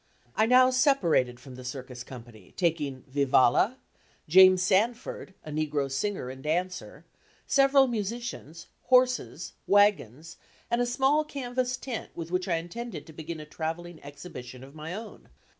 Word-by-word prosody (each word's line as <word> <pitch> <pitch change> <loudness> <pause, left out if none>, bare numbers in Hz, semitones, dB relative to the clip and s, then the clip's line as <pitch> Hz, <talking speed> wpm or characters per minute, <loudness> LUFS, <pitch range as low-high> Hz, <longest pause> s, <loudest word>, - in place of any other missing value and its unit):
I 220 - +3
now 255 +1 +6
separated 175 - +2
from 130 0 -12
the 130 0 -10
circus 125 -1 -7
company, 115 -7 -13
taking 150 -7 -1
Vivalla, 140 - +3 0.5
James 185 +2 +7
Sanford, 205 0 0
(a 155 - -7
negro 150 -2 -1
singer 135 -2 -2
and 130 0 -11
dancer,) 180 +5 -3 0.4
several 275 0 +5
musicians, 220 - -5 0.2
horses, 255 0 +2
wagons, 165 - +2 0.3
and 235 +1 +2
a 245 - +1
small 270 +5 +2
canvas 255 -3 -3
tent 245 -4 -6
with 165 0 -6
which 180 +1 -1
I 175 - +1
intended 220 +9 -6
to 160 - -13
begin 160 +1 -7
a 155 - -8
travelling 165 +2 -5
exhibition 130 -4 -10
of 135 +1 -13
my 155 +3 -7
own. 220 +1 -10
175 Hz, 140 wpm, -28 LUFS, 140-235 Hz, 0.5 s, James